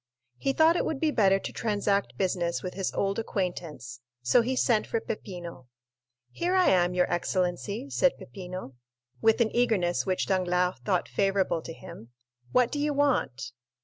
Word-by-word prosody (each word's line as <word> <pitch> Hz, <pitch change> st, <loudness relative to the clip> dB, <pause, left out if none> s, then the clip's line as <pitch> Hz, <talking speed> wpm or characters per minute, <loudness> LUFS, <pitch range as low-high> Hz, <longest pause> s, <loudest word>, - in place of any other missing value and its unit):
He 275 Hz, -, +1 dB
thought 320 Hz, +4 st, +4 dB
it -, -, +1 dB
would 305 Hz, -, -2 dB
be 310 Hz, 0 st, +2 dB
better 195 Hz, -7 st, +4 dB
to -, -, -6 dB
transact 205 Hz, -2 st, 0 dB
business 180 Hz, -3 st, -1 dB
with 185 Hz, -, -4 dB
his 195 Hz, -1 st, -2 dB
old 200 Hz, +2 st, 0 dB
acquaintance, 175 Hz, -, -4 dB, 0.2 s
so 235 Hz, -, +5 dB
he 255 Hz, +3 st, -1 dB
sent 230 Hz, -4 st, +2 dB
for 230 Hz, -, -1 dB
Peppino. 175 Hz, -, -7 dB, 0.6 s
"Here 355 Hz, -, -1 dB
I 370 Hz, -1 st, +5 dB
am, 180 Hz, -1 st, +3 dB
your 180 Hz, 0 st, +4 dB
excellency," 185 Hz, +7 st, -1 dB
said 275 Hz, -, +2 dB
Peppino, 185 Hz, -6 st, -8 dB, 0.5 s
with 225 Hz, +2 st, +4 dB
an 220 Hz, -, +1 dB
eagerness 205 Hz, -8 st, +2 dB
which 185 Hz, -1 st, 0 dB
Danglars 180 Hz, -1 st, +1 dB
thought 185 Hz, -4 st, 0 dB
favorable 195 Hz, -4 st, +1 dB
to 165 Hz, -, -8 dB
him. 115 Hz, -6 st, -12 dB, 0.4 s
"What 250 Hz, -1 st, +3 dB
do 290 Hz, -, -2 dB
you 295 Hz, 0 st, 0 dB
want?" 135 Hz, -, 0 dB
195 Hz, 165 wpm, -28 LUFS, 180-235 Hz, 0.6 s, so